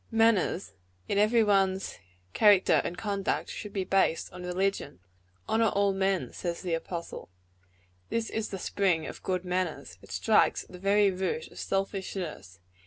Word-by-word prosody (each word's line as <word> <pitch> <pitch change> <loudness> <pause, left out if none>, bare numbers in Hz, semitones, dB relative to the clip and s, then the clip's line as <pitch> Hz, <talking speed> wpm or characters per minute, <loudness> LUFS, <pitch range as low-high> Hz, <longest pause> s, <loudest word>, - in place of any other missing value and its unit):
"Manners, 225 - +2 0.3
like 200 - +1
every 220 +3 +4
thing 215 - +1
else 195 -1 +6
in 190 - 0
one's 190 +1 -6 0.4
character 205 -3 +5
and 175 - -4
conduct, 200 -2 -2
should 210 - -7
be 195 -1 -1
based 185 -4 +1
on 180 - -8
religion. 180 - -2 0.5
Honor 225 +1 +3
all 200 -1 +2
men, 190 -1 0
says 170 0 -4
the 175 -2 -2
apostle. 170 - -5 0.8
This 230 -1 -2
is 220 -1 -2
the 195 - -4
spring 180 -4 0
of - - -8
good 185 -1 -2
manners. 180 -2 -3
It - - -16
strikes - - +3
at - - -20
the 180 - -10
very 200 +1 +3
root 190 - -3
of - - -11
selfishness. 190 - -3
195 Hz, 170 wpm, -29 LUFS, 180-205 Hz, 0.8 s, else